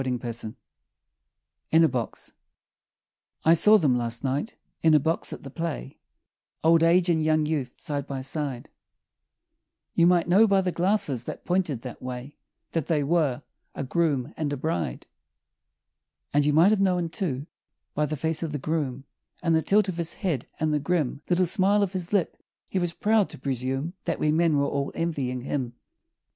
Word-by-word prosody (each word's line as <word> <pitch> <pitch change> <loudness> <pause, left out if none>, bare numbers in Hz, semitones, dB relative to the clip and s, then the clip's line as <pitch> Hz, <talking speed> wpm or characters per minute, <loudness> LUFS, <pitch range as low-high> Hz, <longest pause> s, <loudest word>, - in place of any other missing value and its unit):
In 160 +1 +5
a - - +6
Box 125 -6 -4 1.1
I 165 - +7
saw 210 +6 +6
them 145 -9 +2
last 115 0 -2
night 140 - -2 0.3
in 160 -1 +5
a - - +6
box 160 +4 -1
at - - -7
the 135 - -9
play 160 -3 -5 0.6
Old 165 0 +5
age 170 +2 +4
and 160 -3 +2
young 155 0 +2
youth 145 -5 -2
side 145 -2 -3
by 135 -1 -4
side 135 -2 -4 1.2
You 170 - +4
might 175 -1 +3
know 200 +6 +6
by 195 -1 +3
the 185 -1 -1
glasses 175 - 0
that - - -7
pointed 175 -9 0
that 125 -2 -8
way 125 +3 -6 0.4
That 165 -4 -2
they 155 -3 +1
were 145 -4 +1 0.3
a - - -3
groom 145 -2 0
and 150 -2 -2
a 145 - -2
bride; 155 - -3 1.3
And 145 0 +3
you - - +4
might 170 +7 +6
have 215 -2 +2
known, 180 -3 +2
too, 155 - -3 0.5
by 150 0 0
the 155 +1 -3
face 160 +2 -1
of 160 -3 -3
the - - -1
groom, 140 -3 -2 0.4
And 165 -2 +3
the 160 - +3
tilt 205 +4 +3
of 185 -3 -3
his 170 -1 -3
head, 165 - -2
and 155 -1 +1
the 150 - +2
grim 150 -3 -1
Little 180 +1 +3
smile 200 +3 +3
of 195 -1 -2
his 180 -2 -4
lip, 200 -5 0 0.3
he 190 - +1
was 175 -1 -1
proud 215 0 +2
to - - -7
presume 135 +4 -2
That - - -1
we 150 - +2
men 160 -1 +3
were 140 - +2
all 140 0 -2
envying 140 -7 -2
him. 125 -2 -3
155 Hz, 180 wpm, -26 LUFS, 140-175 Hz, 1.3 s, I